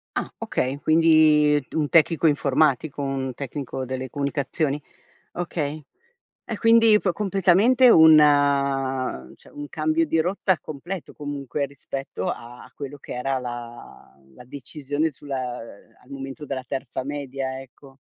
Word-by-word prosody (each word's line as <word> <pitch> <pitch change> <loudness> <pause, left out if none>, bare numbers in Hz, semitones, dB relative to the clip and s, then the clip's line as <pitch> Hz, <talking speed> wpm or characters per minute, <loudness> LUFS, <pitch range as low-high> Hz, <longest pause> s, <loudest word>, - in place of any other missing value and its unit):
Ah, - - -2
okay, 130 +2 -2
quindi 155 -2 +4
un 155 -2 +1
tecnico 165 +1 +3
informatico, 145 -1 +1
un 135 -1 -3
tecnico 135 -1 -5
delle 130 0 -5
comunicazioni? 140 +1 -2 0.5
Okay. 155 -4 -4 0.6
È 225 - -5
quindi 225 -1 +5
po 190 -3 0
completamente 200 +7 +4
un 160 -5 +8 1.2
cioè, - - -19
un 145 0 -8
cambio 155 +2 0
di 160 - 0
rotta 185 +1 0
completo 165 +6 -7
comunque 145 -1 -4
rispetto 135 -7 -6
a 120 +1 -9
quello 140 +1 -7
che - - -9
era 130 +2 -1
la 120 - -9 0.2
la - - -14
decisione 145 +3 -3
sulla 130 -3 -5 0.4
al - - -23
momento 135 +2 -7
della 130 -2 -4
terza 130 0 -4
media, 135 -2 -4
ecco. 135 +1 -16
145 Hz, 125 wpm, -24 LUFS, 135-160 Hz, 1.2 s, un